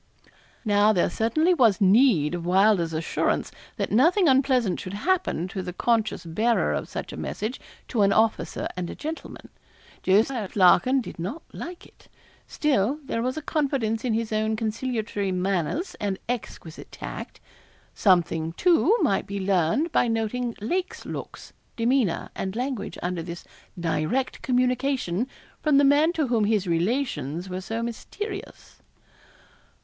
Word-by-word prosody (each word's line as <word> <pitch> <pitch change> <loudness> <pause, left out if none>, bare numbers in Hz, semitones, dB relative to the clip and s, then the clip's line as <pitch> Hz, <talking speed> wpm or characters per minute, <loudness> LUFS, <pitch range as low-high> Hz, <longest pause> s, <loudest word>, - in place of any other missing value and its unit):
Now 205 0 +4
there 175 -3 +1
certainly 310 - +2
was 230 - +4
need 195 - +4
of 175 -1 -3
Wylder's 185 -1 +3
assurance 160 +1 -1 0.3
that - - -2
nothing 335 - +4
unpleasant 260 -7 +3
should 185 +2 -6
happen 335 - 0
to 190 - -4
the 180 -1 -6
conscious 220 -1 0
bearer 220 +9 +1
of - - -3
such - - -6
a - - -7
message 220 +5 -4 0.3
to 230 - 0
an 200 0 +4
officer 220 +1 +1
and 180 -2 -4
a - - -6
gentleman. 315 +2 -7 0.5
Jos. 205 +7 +3 0.2
Larkin 205 +7 +5
did 215 - -9
not 225 - -5
like 350 +1 -8
it. - - -21 0.4
Still 275 -3 +1
there 230 - -2
was 255 +4 -2
a 310 - -4
confidence 265 -9 -1
in 240 -4 0
his 225 -1 -2
own 215 0 +1
conciliatory 220 -3 -2
manners 185 - -1
and 200 -2 -1
exquisite 220 -9 -6
tact. - - -8 0.5
Something, 170 -4 +2
too, 360 - +3
might 195 - +1
be 200 0 -4
learned 190 - +1
by 245 - +3
noting 230 +1 -1
Lake's 370 - -3
looks, - - -8 0.2
demeanour, 235 -5 +1
and 190 +1 -4
language 245 -4 -3
under 180 -1 -2
this 170 +1 -7 0.4
direct 170 +10 -1
communication 250 -4 0 0.3
from 300 -3 +3
the 285 - +5
man 290 +4 +5
to 315 -4 0
whom 235 -4 +1
his 210 -2 +1
relations 175 - -1
were 185 +1 -4
so 225 +4 -3
mysterious. 390 - -7
220 Hz, 145 wpm, -25 LUFS, 185-265 Hz, 0.5 s, Larkin